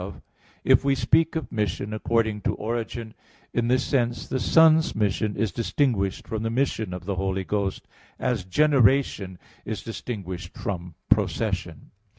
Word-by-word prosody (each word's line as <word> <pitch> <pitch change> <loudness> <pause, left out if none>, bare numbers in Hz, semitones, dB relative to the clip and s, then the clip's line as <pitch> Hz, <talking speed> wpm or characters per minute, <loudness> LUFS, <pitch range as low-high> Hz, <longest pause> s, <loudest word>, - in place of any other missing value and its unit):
1), - - -8 0.4
if - - +5
we 140 0 +3
speak 155 +6 +2
of 160 - -3
mission 105 -1 -2
according 110 -1 0
to - - 0
origin, 115 0 -4 0.4
in 120 -1 +1
this 130 +1 +3
sense 120 -4 0
the 130 - -1
Son's 160 +2 +5
mission 105 0 0
is 105 -1 0
distinguished 105 - 0
from 110 -1 -3
the 115 - -1
mission 115 -5 -1
of 90 -1 -6
the 100 -1 -2
Holy 95 0 -1
Ghost, 100 0 -2 0.3
as 125 -6 -1
generation 125 - +2 0.3
is 110 -1 -5
distinguished 95 -6 -6
from 90 -4 -4
procession. - - 0
110 Hz, 150 wpm, -25 LUFS, 95-125 Hz, 0.4 s, if